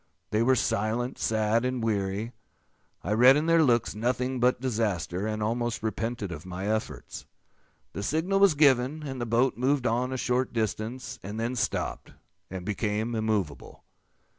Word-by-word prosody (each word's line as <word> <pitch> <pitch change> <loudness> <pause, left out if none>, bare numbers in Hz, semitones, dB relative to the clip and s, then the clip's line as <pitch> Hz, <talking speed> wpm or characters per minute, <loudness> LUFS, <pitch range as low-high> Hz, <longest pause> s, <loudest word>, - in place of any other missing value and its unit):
They 105 - +2
were 130 +3 +4
silent, 115 +3 -1
sad, 110 +1 +1
and 125 -2 -1
weary. 105 +1 -1 0.7
I - - -3
read 125 +5 +7
in 150 - 0
their 165 0 +4
looks 120 -6 +2
nothing 125 +3 -1
but 125 +1 +3
disaster, 105 - -1
and 110 0 -2
almost 115 +1 -1
repented 110 -2 -3
of 80 -2 -7
my 95 +2 -5
efforts. 110 0 -4 0.7
The - - -4
signal 160 - 0
was 195 -5 +5
given, 140 +1 +3
and 135 -3 -5
the 120 - -2
boat 120 +1 +2
moved 130 +1 +1
on 125 +2 +1
a 130 - -2
short 125 +1 0
distance, 115 +2 -3
and 105 +4 -6
then 120 +3 -1
stopped, 110 -2 -2 0.4
and 95 -1 -6
became 105 +2 -1
immovable. 110 -8 -2
115 Hz, 160 wpm, -27 LUFS, 105-130 Hz, 0.7 s, read